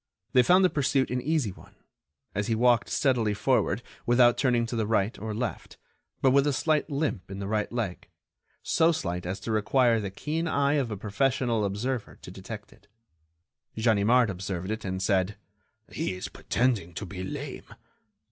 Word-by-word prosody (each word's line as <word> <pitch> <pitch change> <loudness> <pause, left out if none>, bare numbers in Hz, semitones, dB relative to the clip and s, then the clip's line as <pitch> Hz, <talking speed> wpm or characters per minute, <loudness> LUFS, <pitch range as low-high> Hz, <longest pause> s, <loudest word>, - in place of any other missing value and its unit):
They 125 - +7
found 180 +9 +5
the - - +4
pursuit 135 -4 +1
an 125 0 -1
easy 150 -6 0
one, - - -16 0.6
as 105 +1 -2
he 115 - +1
walked 120 0 +3
steadily 120 -7 +1
forward - - +1 0.2
without 120 0 +5
turning 120 -3 +2
to 120 - -5
the 110 -2 0
right 110 -1 +1
or 110 +2 -4
left, 115 +2 -4 0.5
but 135 - +5
with 140 +2 +4
a 145 - +2
slight 150 +3 +1
limp 140 - -2
in 95 - -6
the 100 - -4
right 105 0 -1
leg, 115 -7 -3 0.6
so 165 0 +3
slight 90 - -3
as 95 +2 -3
to 115 - -4
require 115 +2 +3
the 100 -2 -3
keen 155 - -3
eye 140 -2 +2
of 125 - -3
a 105 - -4
professional 115 +2 0
observer 105 +5 -3
to - - -9
detect - - -9
it. 100 - -25 0.9
Ganimard 110 +1 +3
observed 95 0 -4
it, 110 +1 -4
and 95 0 -3
said: 95 +1 +1 0.5
"He - - -2
is 90 - -6
pretending 110 -9 -1
to 100 - -4
be 95 -1 -6
lame. 95 - -6
115 Hz, 175 wpm, -27 LUFS, 100-130 Hz, 0.9 s, They